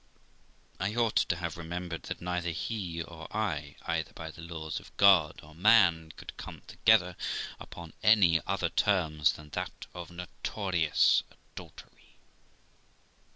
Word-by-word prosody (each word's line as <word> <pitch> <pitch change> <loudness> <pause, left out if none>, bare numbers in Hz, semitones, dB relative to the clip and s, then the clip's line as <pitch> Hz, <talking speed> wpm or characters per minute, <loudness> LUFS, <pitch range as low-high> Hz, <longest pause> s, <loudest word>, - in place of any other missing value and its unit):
I 100 +3 -1
ought 115 -2 +2
to 85 - +2
have 85 -2 -4
remembered 85 0 -5
that - - -5
neither 90 -1 -2
he 85 -1 -3
or 80 -1 -10
I, 80 -10 -2
either 80 -3 -1
by 80 0 -7
the 80 - -12
laws 80 -2 -5
of - - -17
God 95 -7 +5
or 75 +1 -14
man, 85 -4 +4
could - - -9
come - - -9
together 95 -6 +3 0.4
upon 85 -2 -10
any 95 -7 +5
other - - 0
terms 80 -7 +2
than 75 0 -12
that - - -5
of 90 -2 -7
notorious 90 -1 +1
adultery. - - -15
85 Hz, 135 wpm, -30 LUFS, 80-95 Hz, 0.4 s, God